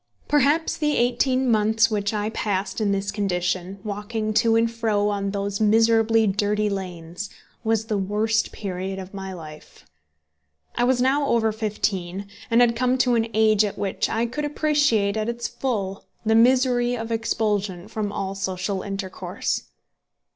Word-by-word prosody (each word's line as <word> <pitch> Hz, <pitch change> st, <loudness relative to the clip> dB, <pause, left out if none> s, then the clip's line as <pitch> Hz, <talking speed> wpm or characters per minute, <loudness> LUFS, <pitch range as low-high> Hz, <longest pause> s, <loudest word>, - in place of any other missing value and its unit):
Perhaps 295 Hz, +3 st, +2 dB
the 300 Hz, -1 st, +1 dB
eighteen 255 Hz, +2 st, +2 dB
months 220 Hz, 0 st, +3 dB
which 205 Hz, -1 st, 0 dB
I 210 Hz, 0 st, -2 dB
passed 205 Hz, -1 st, -2 dB
in 205 Hz, -2 st, +2 dB
this 200 Hz, 0 st, -1 dB
condition, 185 Hz, -2 st, -1 dB
walking 215 Hz, +1 st, -3 dB
to 225 Hz, +1 st, +3 dB
and 230 Hz, 0 st, +4 dB
fro 215 Hz, -3 st, 0 dB
on 200 Hz, -1 st, -1 dB
those 200 Hz, +1 st, -3 dB
miserably 225 Hz, +1 st, +4 dB
dirty 210 Hz, +1 st, +1 dB
lanes, 180 Hz, 0 st, -5 dB, 0.3 s
was 225 Hz, -1 st, +1 dB
the 215 Hz, -2 st, -1 dB
worst 215 Hz, +3 st, 0 dB
period 190 Hz, -1 st, -4 dB
of 190 Hz, 0 st, -8 dB
my 190 Hz, -1 st, -6 dB
life. 155 Hz, -4 st, -11 dB, 0.9 s
I 240 Hz, -, +1 dB
was 250 Hz, 0 st, +2 dB
now 280 Hz, +2 st, +2 dB
over 225 Hz, -3 st, +2 dB
fifteen, 200 Hz, -3 st, -2 dB, 0.2 s
and 230 Hz, +1 st, +4 dB
had 235 Hz, -1 st, +4 dB
come 255 Hz, +1 st, +1 dB
to 250 Hz, -1 st, +3 dB
an 230 Hz, -1 st, +2 dB
age 215 Hz, -1 st, +4 dB
at 205 Hz, -, -3 dB
which 200 Hz, -2 st, -1 dB
I 225 Hz, +1 st, 0 dB
could 280 Hz, +6 st, -4 dB
appreciate 290 Hz, -9 st, +2 dB
at 215 Hz, +1 st, -1 dB
its 235 Hz, 0 st, -3 dB
full 215 Hz, -6 st, -3 dB, 0.2 s
the 220 Hz, -, +3 dB
misery 245 Hz, +1 st, +4 dB
of 225 Hz, 0 st, -5 dB
expulsion 210 Hz, -5 st, -1 dB
from 215 Hz, -2 st, -3 dB
all 195 Hz, -1 st, -3 dB
social 190 Hz, 0 st, -2 dB
intercourse. 190 Hz, -2 st, -4 dB
215 Hz, 155 wpm, -24 LUFS, 195-230 Hz, 0.9 s, and